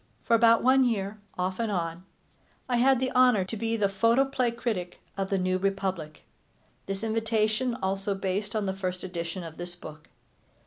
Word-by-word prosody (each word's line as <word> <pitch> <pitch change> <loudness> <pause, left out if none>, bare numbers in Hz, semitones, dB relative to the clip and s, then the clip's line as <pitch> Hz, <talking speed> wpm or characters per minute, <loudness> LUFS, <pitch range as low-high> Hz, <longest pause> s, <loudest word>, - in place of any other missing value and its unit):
For 235 - 0
about 230 0 +5
one 260 +1 +5
year, 210 -3 -1 0.2
off 185 +2 -2
and 225 -2 0
on, 170 -1 -3 0.6
I 245 -2 +1
had 260 +1 +4
the 260 0 -1
honor 250 -7 +4
to 205 - -5
be 225 +1 -1
the 205 -2 +2
photoplay 240 +6 +2
critic 225 -7 -3 0.2
of 195 -1 -2
The 195 - +1
New 185 0 0
Republic, 190 -5 -2 0.6
this 195 +2 -4
invitation 225 +2 0
also 195 +1 -1
based 195 +2 -2
on 215 -2 0
the 190 - -1
first 185 -1 -4
edition 175 0 -4
of 165 -1 -9
this 175 0 -6
book. 155 -3 -11
200 Hz, 175 wpm, -28 LUFS, 185-230 Hz, 0.6 s, about